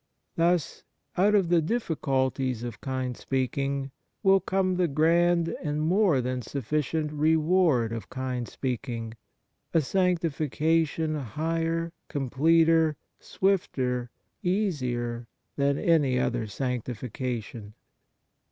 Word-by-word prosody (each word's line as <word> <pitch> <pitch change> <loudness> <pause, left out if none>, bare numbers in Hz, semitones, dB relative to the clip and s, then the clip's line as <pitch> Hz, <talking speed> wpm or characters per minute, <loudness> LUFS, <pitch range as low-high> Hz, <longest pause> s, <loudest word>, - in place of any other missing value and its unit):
Thus, 170 -1 +1 0.3
out 205 +3 +4
of 190 -5 +3
the 170 -1 +4
difficulties 135 - -1
of 120 -3 -6
kind 130 -2 -3
speaking 135 +2 -2 0.3
will 195 -1 +6
come 185 -1 0
the 180 -1 +2
grand 165 +3 +3
and 150 -3 -2
more 170 -2 +3
than 125 0 -2
sufficient 150 +5 -2
reward 155 -4 +3
of 115 -1 -6
kind 130 -2 -3
speaking, 120 -3 -4 0.6
a 165 - +6
sanctification 160 -2 +1
higher, 165 +5 -2
completer, 160 +3 +3 0.2
swifter, 130 -11 0 0.3
easier, 125 - -1 0.3
than 140 0 +1
any 145 -7 +3
other 120 -3 0
sanctification. 120 -2 -4
145 Hz, 95 wpm, -27 LUFS, 125-165 Hz, 0.6 s, will